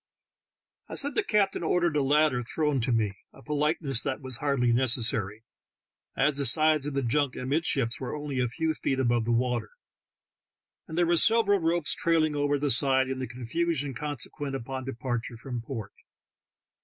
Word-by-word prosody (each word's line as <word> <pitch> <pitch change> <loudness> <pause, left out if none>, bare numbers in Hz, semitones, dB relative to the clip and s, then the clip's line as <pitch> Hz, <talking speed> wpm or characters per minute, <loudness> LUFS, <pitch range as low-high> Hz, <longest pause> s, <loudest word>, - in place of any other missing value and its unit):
" - - -58
I - - -6
said 285 +1 +3
the 425 - +2
captain 210 - +1
ordered 170 -1 +1
a 145 - +2
ladder 145 -2 +2
thrown 145 +2 -1
to 120 - -1
me, 110 -4 +1 0.2
a 135 - -16
politeness 150 -3 0
that 135 -2 -3
was 130 -3 -1
hardly 130 -4 +1
necessary, 115 -4 0 0.7
as 140 +1 +2
the 140 - 0
sides 155 +2 +3
of 145 - -4
the 140 - 0
junk 135 +2 0
amidships 135 -3 0
were 130 - -4
only 145 -3 -4
a 125 - +1
few 160 +7 -1
feet 135 -3 -2
above 120 -3 +1
the 120 - 0
water, 120 -1 0 1.2
and 160 - -7
there 175 - +3
were 170 0 +2
several 215 0 +4
ropes 165 -1 +1
trailing 160 -2 +1
over 145 0 +1
the 145 0 0
side 130 +2 +3
in 130 - -4
the 130 - -3
confusion 140 +4 -2
consequent 145 +1 -3
THE - - -1
TALKING 135 +2 -8
HANDKERCHIEF. 135 - -4
15 - - -19
Upon 120 -2 0
departure 120 0 -8
from 120 0 -6
port. 115 -4 -7
135 Hz, 190 wpm, -27 LUFS, 125-155 Hz, 1.2 s, several